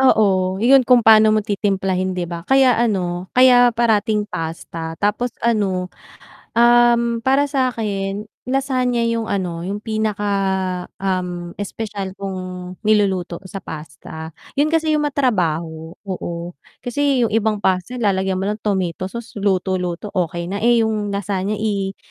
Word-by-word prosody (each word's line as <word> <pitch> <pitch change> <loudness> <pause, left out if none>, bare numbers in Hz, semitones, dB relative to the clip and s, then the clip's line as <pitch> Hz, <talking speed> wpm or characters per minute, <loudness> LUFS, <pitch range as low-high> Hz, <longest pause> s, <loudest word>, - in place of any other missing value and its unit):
Oo, 190 -7 +3
yun 255 +6 +5
kung 245 -2 +5
paano 220 -1 +7
mo 215 - 0
titimplahin 195 -3 -1
'di 175 - -1
ba. 170 0 -6
Kaya 265 -3 +4
ano, 185 -5 -1
kaya 250 -1 +7
parating 220 -2 +2
pasta 165 -2 -6
tapos 210 +4 0 0.2
ano, 190 -6 0 0.6
um, 235 0 +4
para 275 +2 +3
sakin 210 -6 -2 0.2
lasagna 255 -2 0
yung 230 -1 0
ano, 175 -5 -3
yung 205 +2 -4
pinaka, 215 -2 -2 0.7
um, 180 -2 -3
espesyal 205 -2 -5
kong 185 -2 -6
niluluto 195 -5 +1
sa 195 - -6
pasta. 160 +1 -8 0.2
Yun 295 +2 +2
kasi 320 -1 +1
yung 300 - +2
ma-trabaho, 165 - -1
oo. 175 -2 -5 0.3
Kasi 265 -1 +1
yung 220 - -3
ibang 220 -1 +1
pasta 190 +5 -1
lalagyan 190 -4 0
mo 190 - -2
lang 210 +1 -3
tomato 185 -2 -1
sauce 235 +1 -8
luto-luto, 185 -1 -1
okey 170 -1 -1
na. 200 +3 -4
Eh, 235 0 +4
yung 210 -2 -1
lasagna 200 +1 -2
i 200 -2 -2
205 Hz, 135 wpm, -20 LUFS, 185-235 Hz, 0.7 s, paano